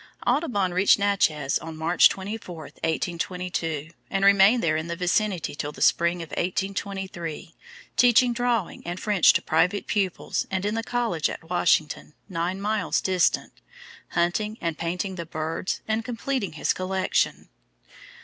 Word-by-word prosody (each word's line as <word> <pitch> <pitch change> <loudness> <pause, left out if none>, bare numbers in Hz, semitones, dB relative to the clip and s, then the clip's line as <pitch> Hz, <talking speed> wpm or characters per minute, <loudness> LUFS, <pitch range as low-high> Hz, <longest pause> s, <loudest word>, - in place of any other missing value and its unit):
Audubon 245 - +1
reached 185 +2 +5
Natchez 160 -9 +1
on 160 0 -8
March 165 +3 +5
24, 195 -2 -6
1822, 165 -1 -3 0.2
and 195 0 +1
remained 200 +4 +6
there 160 -2 +2
and 160 0 -2
in - - -8
the 170 - -3
vicinity 180 0 0
till 145 0 -4
the - - -13
spring 170 0 +2
of 165 - -11
1823, 190 -3 -4 0.4
teaching 245 0 +5
drawing 235 -5 -1
and 175 +1 -5
French 205 -4 +5
to - - 0
private 180 +5 +1
pupils 195 -4 -1
and 190 0 -2
in 210 - 0
the 225 - -1
college 230 -9 -1
at 165 - -9
Washington, 155 -4 +1
nine 180 0 -2
miles 205 -3 0
distant, 185 -2 +1 0.6
hunting, 210 +6 0
and 165 -2 -3
painting 180 +3 -3
the 170 - -4
birds, 160 +3 -3
and 220 +1 0
completing 235 - -3
his 155 - 0
collection. 185 0 -1
185 Hz, 145 wpm, -25 LUFS, 165-205 Hz, 0.6 s, remained